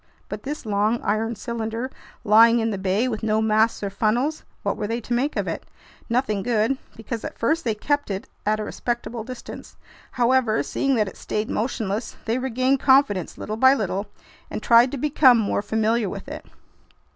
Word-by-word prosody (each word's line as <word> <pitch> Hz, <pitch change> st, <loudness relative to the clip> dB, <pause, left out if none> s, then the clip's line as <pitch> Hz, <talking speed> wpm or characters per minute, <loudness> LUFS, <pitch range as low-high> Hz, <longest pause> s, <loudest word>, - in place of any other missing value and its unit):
But 210 Hz, -, -5 dB
this 290 Hz, +1 st, -6 dB
long, 210 Hz, +2 st, +1 dB
iron 225 Hz, +2 st, 0 dB
cylinder 230 Hz, +2 st, -4 dB, 0.3 s
lying 230 Hz, +3 st, +6 dB
in 225 Hz, -1 st, 0 dB
the 200 Hz, -, -3 dB
bay, 195 Hz, +6 st, +1 dB
with 220 Hz, -4 st, -3 dB
no 215 Hz, -1 st, +1 dB
masts 220 Hz, 0 st, +2 dB
or 200 Hz, -, -2 dB
funnels—what 240 Hz, +9 st, -1 dB
were 210 Hz, -, -3 dB
they 230 Hz, +2 st, -2 dB
to 240 Hz, +1 st, -4 dB
make 265 Hz, +5 st, 0 dB
of -, -, -1 dB
it? -, -, -3 dB, 0.5 s
Nothing 230 Hz, -4 st, 0 dB
good, 235 Hz, +4 st, +1 dB, 0.2 s
because 225 Hz, 0 st, -6 dB
at -, -, -6 dB
first 315 Hz, +9 st, +1 dB
they 225 Hz, -3 st, 0 dB
kept 285 Hz, +5 st, -1 dB
it 195 Hz, -1 st, -4 dB, 0.2 s
at 215 Hz, +1 st, +1 dB
a -, -, -2 dB
respectful 240 Hz, +1 st, -4 dB
distance. 255 Hz, +2 st, -9 dB, 0.4 s
However, 245 Hz, -2 st, +2 dB
seeing 275 Hz, -1 st, 0 dB
that 215 Hz, -3 st, +1 dB
it -, -, -9 dB
stayed 215 Hz, +1 st, -3 dB
motionless, 215 Hz, -2 st, -2 dB
they 230 Hz, +3 st, 0 dB
regained 260 Hz, +1 st, +1 dB
confidence 260 Hz, -, +3 dB
little 215 Hz, +1 st, -5 dB
by 260 Hz, +3 st, +6 dB
little 200 Hz, -3 st, -2 dB, 0.4 s
and -, -, -5 dB
tried 235 Hz, +2 st, +6 dB
to 280 Hz, -, -3 dB
become 270 Hz, -2 st, +5 dB
more 210 Hz, -2 st, 0 dB
familiar 220 Hz, 0 st, 0 dB
with 200 Hz, +6 st, -7 dB
it. 300 Hz, -, -8 dB
225 Hz, 180 wpm, -23 LUFS, 215-255 Hz, 0.5 s, lying